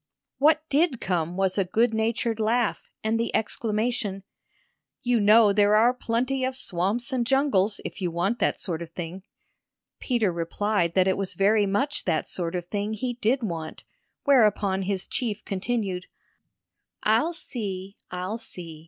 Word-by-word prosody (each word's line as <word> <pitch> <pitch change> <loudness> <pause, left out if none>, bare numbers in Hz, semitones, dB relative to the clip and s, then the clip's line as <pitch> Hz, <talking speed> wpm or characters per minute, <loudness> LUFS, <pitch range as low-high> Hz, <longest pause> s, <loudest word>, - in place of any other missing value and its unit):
What 310 +2 +4
did 290 -3 +2
come 175 -1 -1
was 190 0 +1
a - - +4
good 225 +6 +1
natured 225 0 0
laugh 225 0 0
and 220 +1 +1
the 230 - 0
exclamation: 215 -3 -1 0.8
"You 245 -1 +2
know 210 0 +6
there 205 0 +4
are 235 +3 +5
plenty 250 +2 -1
of 260 0 -1
swamps 220 +4 -1
and 250 -2 +1
jungles, 235 -6 +2
if - - -6
you 180 - 0
want 175 +8 -1
that - - +1
sort 170 -3 -3
of 170 - -6
thing," 175 +2 -6 0.8
Peter 235 -7 +1
replied 170 +1 -1
that 185 -1 +4
it 190 - +2
was 195 -2 -3
very 205 +1 +3
much 275 +10 -1
that 160 -4 0
sort 175 -1 -4
of 175 -1 -3
thing 205 +3 -2
he 245 +3 -2
did 245 +2 0
want; 165 -6 -5 0.4
whereupon 210 -8 +3
his 190 0 -2
chief 215 -4 -3
continued: 195 -2 -2 1.0
"I'll 230 +11 +3
see 200 - -5
I'll 185 +5 -4
see. 170 -8 -9
210 Hz, 155 wpm, -26 LUFS, 185-240 Hz, 1.0 s, know